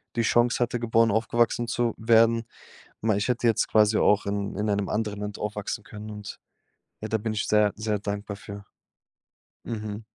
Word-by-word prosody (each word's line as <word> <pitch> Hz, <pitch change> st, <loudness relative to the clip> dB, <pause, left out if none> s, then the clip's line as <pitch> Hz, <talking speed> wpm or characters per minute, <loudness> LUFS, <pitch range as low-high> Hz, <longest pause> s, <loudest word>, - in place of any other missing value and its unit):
die 115 Hz, -, +1 dB
Chance 120 Hz, +1 st, +2 dB
hatte, 120 Hz, 0 st, 0 dB
geboren 115 Hz, -1 st, +3 dB
aufgewachsen 120 Hz, +1 st, +1 dB
zu 120 Hz, -1 st, 0 dB
werden. 115 Hz, 0 st, +4 dB, 0.6 s
Mei 110 Hz, -2 st, +2 dB
ich 105 Hz, -, -1 dB
hätte 120 Hz, -1 st, 0 dB
jetzt 115 Hz, -, +2 dB
quasi 110 Hz, 0 st, +4 dB
auch 105 Hz, 0 st, +3 dB
in 100 Hz, -1 st, -2 dB
in 105 Hz, +1 st, -1 dB
einem 100 Hz, -1 st, 0 dB
anderen 105 Hz, -2 st, -2 dB
Land 105 Hz, -1 st, -5 dB
aufwachsen 105 Hz, +1 st, -4 dB
können 105 Hz, +1 st, -9 dB
und 105 Hz, -1 st, -8 dB, 0.6 s
ja, 110 Hz, -, -4 dB
da 110 Hz, -, 0 dB
bin 110 Hz, +1 st, -3 dB
ich 110 Hz, -, -1 dB
sehr, 105 Hz, -1 st, +3 dB
sehr 110 Hz, -1 st, -1 dB
dankbar 100 Hz, 0 st, -4 dB
für. 100 Hz, 0 st, -9 dB, 1.0 s
Mhm. 110 Hz, -1 st, -5 dB
110 Hz, 175 wpm, -26 LUFS, 105-115 Hz, 1.0 s, werden